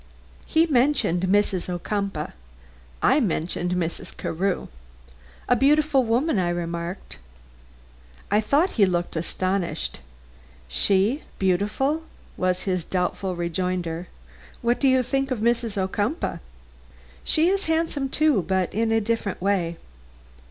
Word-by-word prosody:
He 320 +1 +4
mentioned 260 - +2
Mrs. 195 -2 +1
Ocumpaugh; 180 -2 -3 0.7
I 300 - +5
mentioned 180 - -1
Mrs. 175 -2 -3
Carew. 185 +3 -1 0.8
"A 245 - +4
beautiful 285 +1 +4
woman," 240 +2 +1
I 175 -1 +1
remarked. 170 +1 -4 1.1
I 210 - +4
thought 285 - +2
he 200 -4 +4
looked 175 -1 -1
astonished. 170 - -2 0.7
"She 200 - +2 0.2
beautiful?" 210 - +1 0.3
was 185 0 0
his 185 -3 -1
doubtful 180 +1 -2
rejoinder. 175 0 -2 0.6
"What 240 +1 +2
do 275 - +3
you 260 -1 +4
think 270 +2 -1
of 255 - -1
Mrs. 230 -1 0
Ocumpaugh?" 205 - -1 0.8
"She 325 +2 +3
is 395 +1 0
handsome, 320 -4 0
too, 300 -7 +3
but 190 0 -1
in 225 +1 +1
a 225 - +4
different 220 -2 -2
way." 180 -3 0
200 Hz, 115 wpm, -24 LUFS, 180-260 Hz, 1.1 s, I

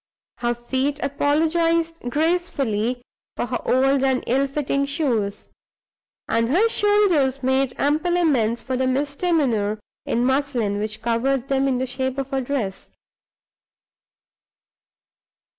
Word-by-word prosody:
Her 240 0 0
feet 265 +4 -2
apologized 325 +4 +1
gracefully 275 - 0 0.3
for - - -1
her 245 - -3
old 270 +1 +3
and 265 -1 +1
ill 270 +3 +1
fitting 280 0 -1
shoes; 235 -9 -1 0.8
and 230 0 +1
her 375 - +4
shoulders 370 - +2
made 265 0 +1
ample 310 +5 +1
amends 240 -9 +1
for 260 - -2
the 260 0 0
misdemeanor 270 - 0 0.3
in 240 +1 +1
muslin 260 -6 0
which 215 +1 -4
covered 245 +3 0
them 270 0 +2
in 260 -2 +1
the 260 - -1
shape 260 +1 -3
of 275 0 -4
a 270 - +1
dress. 245 -7 -3
270 Hz, 120 wpm, -22 LUFS, 245-290 Hz, 0.8 s, her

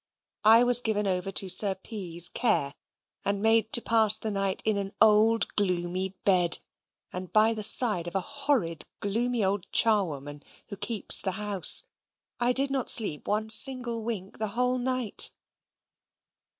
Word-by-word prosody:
I 225 +2 +5
was 245 0 +4
given 210 -3 -3
over 190 0 -3
to 195 - -2
Sir 190 +1 +4
P.'s 180 -4 -2
care, 210 - -1 0.5
and 200 0 -2
made 220 +1 0
to 235 - +4
pass 220 -2 +3
the 220 - -6
night 195 -1 -4
in 215 -1 0
an 195 0 -7
old 220 +1 +2
gloomy 185 -1 -3
bed, 180 -3 +4 0.6
and 180 0 -8
by 220 +1 +2
the 215 - -6
side 210 -4 +4
of 175 - -9
a - - 0
horrid 275 - -3
gloomy 230 +3 -3
old 195 0 -4
charwoman, 150 -10 0 0.3
who 200 - -8
keeps 210 +2 0
the 190 - -4
house. 205 - +3 0.6
I 240 0 0
did 275 +2 +1
not 270 -3 -3
sleep 200 -10 +2
one 215 +1 -3
single 240 -1 +3
wink 205 -4 -7
the 215 - -2
whole 250 0 -1
night. 255 -3 +1
210 Hz, 155 wpm, -25 LUFS, 190-230 Hz, 0.6 s, I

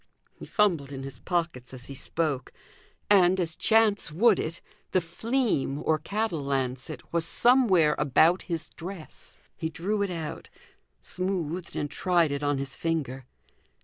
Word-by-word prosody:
He - - -11
fumbled 170 -10 +2
in 135 -1 -6
his 135 -3 -7
pockets 160 -8 -2
as 125 -1 -8
he 140 - -8
spoke, 140 -1 -2 0.6
and, 190 -2 +5
as 165 -2 -1
chance 220 -6 +3
would 205 +5 +4
it, 165 +2 -3 0.3
the 185 - +5
"fleam" 175 - -1
(or 155 -1 +2
cattle 200 -2 -2
lancet) 130 0 -3
was 170 -1 +2
somewhere 195 -9 +4
about 155 +5 +4
his 165 -2 -2
dress. 175 -1 -9 0.2
He 160 - -3
drew 200 +6 -2
it 200 - 0
out, 165 -4 -5 0.5
smoothed 180 -2 -3
and 145 - -1
tried 175 -5 +2
it 140 0 -2
on 145 -1 +1
his 135 -2 -4
finger. 135 -6 -2
165 Hz, 145 wpm, -27 LUFS, 140-190 Hz, 0.6 s, and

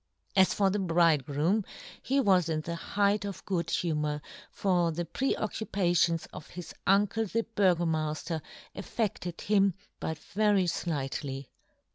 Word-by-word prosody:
As 190 -1 +5
for 195 -2 +3
the 205 - 0
bridegroom 165 +1 +2 0.4
he 270 +3 +1
was 185 -8 +4
in 155 -1 0
the 170 +2 -4
height 200 +4 +1
of 200 -2 -6
good 180 -4 -1
humour, 150 -3 0 0.3
for 175 -4 +1
the 170 +2 -3
pre 265 +9 0
occupations 175 -6 +1
of - - -9
his 175 -1 -8
uncle 205 +3 +3
the 230 +4 0
Burgomafter 165 -4 +1 0.3
affedled 190 -6 -3
him 200 -3 +3 0.2
but 160 - -3
very 205 +2 +1 0.2
(lightly. 135 -3 -3
175 Hz, 130 wpm, -29 LUFS, 160-200 Hz, 0.4 s, As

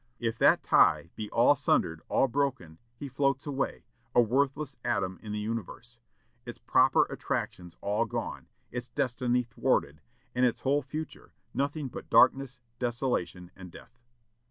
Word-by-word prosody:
If 115 -1 -3
that - - +5
tie 85 - +4
be 105 -1 -5
all 120 +5 +4
sundered, 85 - +1
all 135 - +3
broken, 130 - -2 0.2
he 140 - -7
floats 140 0 0
away, 140 -2 -3 0.3
a - - +6
worthless 135 +4 +1
atom 95 -1 -1
in 105 - -7
the 105 - -3
universe; 115 +2 -6 0.4
its - - -8
proper - - +4
attractions 90 -1 -4
all 105 +3 0
gone, 110 - -5 0.2
its 125 +1 -5
destiny 125 -2 0
thwarted, 75 -9 -1 0.3
and 125 - +1
its 125 -2 +2
whole 140 +2 +2
future 155 +3 -7 0.2
nothing 140 +1 -2
but - - -9
darkness, 130 0 +4 0.2
desolation, 120 -8 -2
and 90 -2 -11
death." 120 - -15
120 Hz, 145 wpm, -29 LUFS, 105-135 Hz, 0.4 s, a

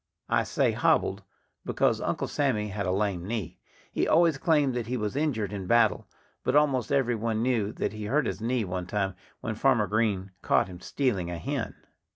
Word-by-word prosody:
I - - +2
say - - +1
hobbled, - - +2 0.4
because - - +1
Uncle - - -1
Sammy 115 -7 0
had 100 -1 -3
a - - +1
lame 95 -2 0
knee. 105 -3 -4 0.3
He - - 0
always 165 -3 +4
claimed 150 -6 +3
that 120 -2 -3
he 125 +1 -1
was 105 +1 -2
injured 120 -9 -1
in 95 -2 -5
battle. 115 0 +3 0.4
But 130 - +1
almost 140 -6 +3
every 135 -4 +2
one 110 0 -1
knew 115 -5 +1
that - - -2
he 110 -1 -6
hurt 140 +8 +1
his 95 +2 -3
knee 120 -1 0
one 90 -1 -4
time 95 -1 -1 0.3
when 110 - -2
Farmer 120 -1 +3
Green 100 -2 0
caught - - +3
him 90 -2 -10
stealing 100 -8 -1
a 85 - -4
hen. 80 - -3
110 Hz, 195 wpm, -28 LUFS, 100-130 Hz, 0.4 s, always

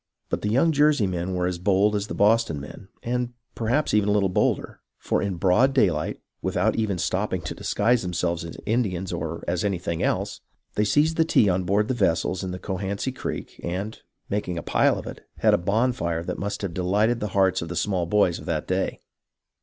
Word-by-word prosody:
But - - -2
the 105 - -1
young 135 +9 +3
Jersey 145 -6 +4
men 90 0 -2
were 90 0 0
as 90 -1 -2
bold 100 +3 +3
as 100 0 -1
the - - -5
Boston 105 -6 +3
men, 75 +7 -10 0.2
and 125 0 -2 0.2
perhaps 120 +7 0
even 105 -1 +3
a - - +3
little 100 -2 +2
bolder, 90 - 0 0.2
for - - -1
in 100 -2 -1
broad 100 +10 +3
daylight, 90 - +1 0.2
without - - +1
even 105 -4 0
stopping 95 +2 -1
to - - -4
disguise 115 +4 +1
themselves 85 -1 -1
as 85 - -8
Indians 95 -6 -1
or 85 -1 -4
as 90 +2 0
anything 85 -4 -2
else, - - -1 0.3
they 105 - +1
seized 150 +9 +2
the 165 - +5
tea 110 -10 +4
on 90 0 0
board 100 +3 +2
the 130 - 0
vessels 90 -4 +1
in 95 - -3
the 90 - -4
Cohansey 100 +6 -3
Creek, 130 - -6
and, 95 +5 -4 0.3
making 95 -4 -2
a - - -4
pile - - +3
of - - -6
it, - - -9
had - - +4
a - - +5
bonfire 100 -4 0
that - - -4
must 100 +1 -3
have 95 -4 -3
delighted 105 +7 +1
the 105 - -2
hearts 95 -1 +3
of 85 - -5
the 85 - -4
small 90 -2 0
boys 90 -3 +2
of - - -11
that - - -2
day. - - -1
100 Hz, 210 wpm, -25 LUFS, 90-110 Hz, 0.3 s, the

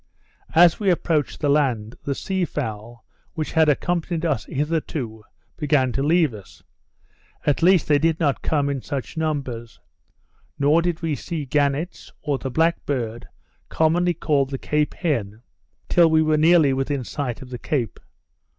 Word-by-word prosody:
As 170 0 +6
we 205 -3 +1
approached 160 -4 0
the 150 - +1
land, 125 -7 +1
the 140 - -3
sea 190 +4 -2
fowl, 115 -6 -5 0.3
which 155 -1 -3
had 160 -1 +4
accompanied 170 +2 -1
us 145 -9 0
hitherto, 145 -6 -3 0.3
began 145 -4 +2
to 135 - -2
leave 155 -2 +3
us; 100 -3 -13 0.8
at 145 - +1
least 180 0 +4
they 145 -1 +4
did 165 +1 +1
not 145 -5 +1
come 145 -3 0
in 140 -2 -2
such 135 -1 -5
numbers. 135 -8 -3 0.8
Nor 145 +4 +3
did 170 -1 -2
we 160 -2 0
see 155 +1 -4
gannets, 145 +4 -1
or 145 -3 -1
the 135 - -4
black 165 +6 +1
bird, 120 -4 -3 0.4
commonly 175 +2 +2
called 145 -4 +1
the 135 - -3
Cape 150 +2 -1
Hen, 115 - -2 0.4
till 170 -2 +5
we 160 0 +4
were 155 0 +2
nearly 155 -2 +5
within 135 0 -1
sight 125 -1 -4
of 130 - -13
the 125 - -5
Cape. 125 -6 -2
145 Hz, 160 wpm, -23 LUFS, 130-160 Hz, 0.8 s, As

